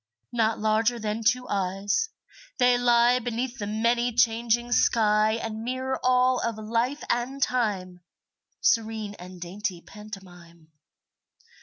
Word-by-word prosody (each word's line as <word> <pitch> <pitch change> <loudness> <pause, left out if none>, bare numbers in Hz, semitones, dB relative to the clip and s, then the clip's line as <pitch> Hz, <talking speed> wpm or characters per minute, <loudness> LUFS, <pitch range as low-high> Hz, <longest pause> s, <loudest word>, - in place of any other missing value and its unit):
Not 225 -2 +1
larger 220 +2 +1
than 215 0 -3
two 250 +3 +2
eyes, 200 - -1 0.5
they 245 0 +4
lie 245 0 +4
Beneath 245 +1 -4
the 205 - -3
many 235 +3 +1
changing 235 0 +1
sky 215 -2 +3
And 225 -1 -4
mirror 260 +2 -2
all 255 0 +3
of 230 -2 -2
life 230 +6 -1
and 245 +3 -1
time, 205 -9 -1 0.6
Serene 220 -2 +1
and 180 0 -10
dainty 180 +1 -4
pantomime. 175 -6 -13
225 Hz, 120 wpm, -26 LUFS, 210-245 Hz, 0.6 s, they